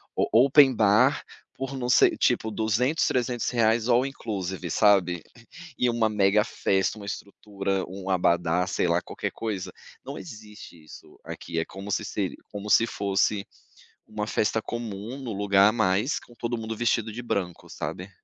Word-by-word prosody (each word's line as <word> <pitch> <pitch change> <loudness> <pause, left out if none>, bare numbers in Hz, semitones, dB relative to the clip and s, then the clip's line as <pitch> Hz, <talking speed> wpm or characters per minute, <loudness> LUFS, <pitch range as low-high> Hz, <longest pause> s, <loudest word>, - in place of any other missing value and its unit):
o - - +1 0.2
open 140 -1 +6
bar, 105 -1 +3 0.3
por 135 +1 -5
não 125 -1 -3
sei 125 - +5
tipo, 110 - +1
200, 110 +8 +1
R$300 120 -2 +1
all 125 +1 +4
inclusive 95 -9 -5
sabe, 90 -4 +3 0.6
e 125 - +2
uma 115 -2 +2
mega 105 0 +3
festa, 95 -3 0
uma 100 - -9
estrutura, 100 0 -4
um 95 +1 -6
abadá, 90 -1 +2
sei 95 - 0
lá, 85 +1 +2
qualquer - - -5
coisa, 105 -5 -4 0.3
não - - -7
existe 105 -4 -12
isso - - -14
aqui, 80 - -6
é 80 - +1
como 95 +4 -9
se 105 +2 -1
se 100 -2 -3
como 105 0 -7
se 115 - +5
fosse 100 0 0 0.6
uma 105 -1 -4
festa 110 +1 0
comum, 115 +1 -6
num 130 -4 -5
lugar 100 0 +4
a - - +2
mais, 110 +3 +1
com 120 - -18
todo 120 0 -3
mundo 110 0 -5
vestido 115 -1 0
de 120 - -6
branco, 95 -7 -3
sabe. 95 +2 -6
105 Hz, 160 wpm, -26 LUFS, 95-115 Hz, 0.6 s, open